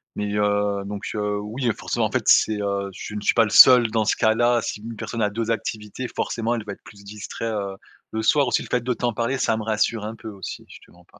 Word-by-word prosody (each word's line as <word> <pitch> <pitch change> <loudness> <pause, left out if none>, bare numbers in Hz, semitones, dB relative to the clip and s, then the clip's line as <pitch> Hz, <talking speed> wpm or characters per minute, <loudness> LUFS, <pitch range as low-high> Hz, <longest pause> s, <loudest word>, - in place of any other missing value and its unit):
mais, 105 0 -3
heu, 105 -1 0
donc, 100 0 -6
heu, 105 -1 -1
oui 110 +5 -4
et 115 - +2
forcément - - -2
en - - -3
fait - - 0
c'est, 105 -1 +4
heu, 100 -1 -2
je 105 - -8
ne 105 - -4
suis - - +2
pas 115 - +4
le - - -4
seul 125 +1 +8
dans 110 -1 +1
ce - - +2
cas-là. 120 +2 +3
Si 105 - -5
une 115 +1 -7
personne 115 +2 -4
a 105 - +2
2 115 +2 -3
activités 110 +2 -4
forcément 115 0 -2
elle 110 -3 -5
va 100 - -5
être - - -17
plus 100 -1 -15
distrait, 105 +2 -7
heu, 100 -3 -3 0.3
le 110 - -2
soir. 140 +6 +3
Aussi 120 - +1
le - - -8
fait 125 - +1
de 125 +1 0
t'en 120 0 -1
parler 120 +4 -1
ça 110 - +1
me 110 - -4
rassure 110 0 0
un 110 - -5
peu 110 - -11
aussi 100 -2 -8
je - - -12
te - - -23
mens 90 0 -20
pas. - - -21
110 Hz, 275 wpm, -23 LUFS, 105-115 Hz, 0.3 s, seul